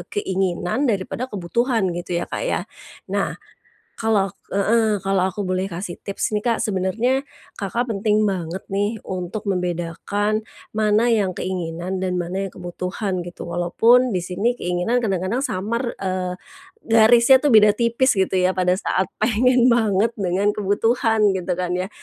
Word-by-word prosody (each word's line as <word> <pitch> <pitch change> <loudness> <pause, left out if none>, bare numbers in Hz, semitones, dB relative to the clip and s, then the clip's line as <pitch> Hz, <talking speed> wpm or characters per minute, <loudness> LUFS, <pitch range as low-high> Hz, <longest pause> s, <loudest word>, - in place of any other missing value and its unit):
keinginan 190 +5 -1
daripada 225 +5 -2
kebutuhan, 205 +1 0
gitu 175 0 -4
ya 175 - -1
Kak - - -5
ya? - - 0 0.5
Nah, - - -1 0.6
kalau 210 -3 +1
ak 200 - -20 0.2
heeh, 215 0 +2
kalau 195 -1 +1
aku 190 +2 -3
boleh 185 0 -1
kasih 175 -1 -6
tips 200 - -2
nih 210 - -4
Kak, 230 -2 +1
sebenarnya 220 +8 0 0.3
Kakak 235 +5 -2
penting 215 0 +1
banget 180 -1 -4
nih, 205 +3 -1
untuk 190 +3 -5
membedakan 180 +4 -1 0.2
mana 215 +2 +2
yang 200 -5 +2
keinginan 180 0 -4
dan 185 -1 -2
mana 190 +3 -3
yang 190 - -8
kebutuhan, 180 +1 -4
gitu. 175 0 -8
Walaupun 230 +8 +3
di 180 - 0
sini 195 +7 -1
keinginan 180 +5 -1
kadang-kadang 195 +4 -1
samar, 235 +1 -2
eee, 185 -1 -3 0.5
garisnya 235 +3 +6
tuh 295 - +2
beda 210 -3 +6
tipis 235 +3 +2
gitu 190 -1 +1
ya 185 +1 +2
pada 180 0 +1
saat 190 -2 -1
pengen 245 +3 +3
banget 220 0 +2
dengan 200 0 0
kebutuhan 215 0 +2
gitu 180 -1 -2
kan 180 -1 -2
ya. 185 +2 -2
195 Hz, 150 wpm, -22 LUFS, 185-225 Hz, 0.6 s, garisnya